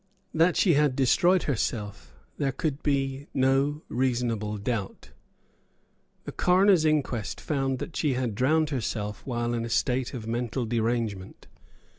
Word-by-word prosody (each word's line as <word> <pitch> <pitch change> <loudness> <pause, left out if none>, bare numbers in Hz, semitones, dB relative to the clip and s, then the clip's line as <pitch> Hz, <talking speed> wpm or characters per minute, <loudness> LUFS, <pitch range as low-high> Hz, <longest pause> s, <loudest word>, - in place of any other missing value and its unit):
That 165 +2 +3
she 180 - +4
had 145 -2 +3
destroyed 175 +8 +3
herself 105 - -3 0.2
there 135 -1 +1
could 145 +1 -3
be 135 -1 -1
no 135 +3 +2
reasonable 120 -4 -1
doubt. 100 -1 -4 1.1
The - - -6
coroner's 185 -2 +4
inquest 140 -8 0
found 135 -3 -1
that 155 - -7
she 150 -4 +1
had 125 -3 -1
drowned 155 +7 +2
herself 105 -5 -3
while 120 -1 -1
in 115 -1 -1
a 115 - -4
state 125 +2 0
of 115 -3 -6
mental 120 +2 -2
derangement. 115 -4 -2
130 Hz, 135 wpm, -27 LUFS, 115-145 Hz, 1.1 s, she